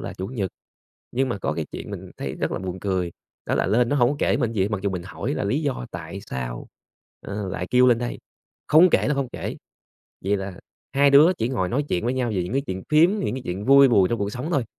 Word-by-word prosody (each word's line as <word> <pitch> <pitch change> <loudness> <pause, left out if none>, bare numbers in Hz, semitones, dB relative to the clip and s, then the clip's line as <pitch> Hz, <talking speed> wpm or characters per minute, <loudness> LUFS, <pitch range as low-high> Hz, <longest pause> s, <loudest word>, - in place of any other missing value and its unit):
là - - -5
Chủ 95 - -5
nhật. 100 -5 -3 0.6
Nhưng 130 +2 +1
mà 115 - -2
có - - -1
cái - - -3
chuyện - - -7
mình - - -7
thấy 65 -1 -4
rất - - -2
là - - -2
buồn 95 0 -5
cười, 95 -3 -1 0.3
đó - - 0
là - - +1
lên 115 +4 +3
nó 145 - +1
hổng 130 +2 +3
kể - - +2
mình 115 - -1
gì 105 -4 +1
hết, 95 - +1
mặc 105 -3 -2
dù 100 - 0
mình 90 -2 -4
hỏi - - -4
là - - -2
lý 135 +10 0
do 135 - -2
tại - - -7
sao, - - -5 0.5
ờ, 100 -1 -5
lại 90 -1 -4
kêu 125 0 +5
lên 120 -2 +5
đây, 120 0 -4 0.5
không 165 +3 +6
kể - - +3
là 150 - +2
không 140 -3 -1
kể. - - -5 0.7
Vậy 100 +2 +2
là 95 -2 -6 0.3
hai 140 +1 +4
đứa 150 +6 +7
chỉ 115 - 0
ngồi 105 -9 -1
nói 140 +7 0
chuyện 90 - -1
với 125 +2 0
nhau 125 -2 0
về 90 - 0
những 90 - -5
cái 135 - +1
chuyện 95 0 -4
phiếm, 155 +4 +6
những 155 - -1
cái 130 - -5
chuyện 95 +4 -4
vui 140 0 +8
buồn 100 -6 +4
trong 115 - -1
cuộc 100 0 -1
sống 130 +6 -4
thôi, 135 -5 +1
115 Hz, 270 wpm, -24 LUFS, 95-135 Hz, 0.7 s, vui